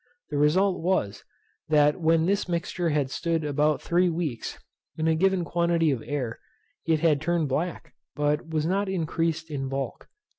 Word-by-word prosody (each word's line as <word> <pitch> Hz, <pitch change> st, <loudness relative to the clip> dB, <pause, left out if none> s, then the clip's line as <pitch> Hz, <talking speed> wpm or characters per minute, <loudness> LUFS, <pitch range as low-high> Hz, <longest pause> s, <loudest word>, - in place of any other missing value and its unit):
The 145 Hz, -, -1 dB
result 180 Hz, +6 st, +3 dB
was, 135 Hz, -, -1 dB, 0.5 s
that 150 Hz, +2 st, +3 dB
when 160 Hz, 0 st, +3 dB
this 195 Hz, 0 st, 0 dB
mixture 170 Hz, 0 st, -1 dB
had 145 Hz, -3 st, 0 dB
stood 165 Hz, 0 st, -1 dB
about 150 Hz, +1 st, +1 dB
three 180 Hz, +1 st, +2 dB
weeks, 160 Hz, -8 st, -3 dB, 0.4 s
in 160 Hz, 0 st, 0 dB
a 160 Hz, -, +4 dB
given 185 Hz, +1 st, +2 dB
quantity 170 Hz, -2 st, +2 dB
of 130 Hz, -4 st, -2 dB
air, 130 Hz, -6 st, -3 dB, 0.5 s
it 160 Hz, -2 st, +2 dB
had 155 Hz, -4 st, +3 dB
turned 165 Hz, -2 st, 0 dB
black, 165 Hz, +6 st, -3 dB, 0.2 s
but 150 Hz, +2 st, 0 dB
was 155 Hz, -1 st, 0 dB
not 195 Hz, +3 st, 0 dB
increased 165 Hz, -2 st, -1 dB
in 135 Hz, -2 st, -3 dB
bulk. 135 Hz, -2 st, -4 dB
160 Hz, 160 wpm, -26 LUFS, 150-170 Hz, 0.5 s, a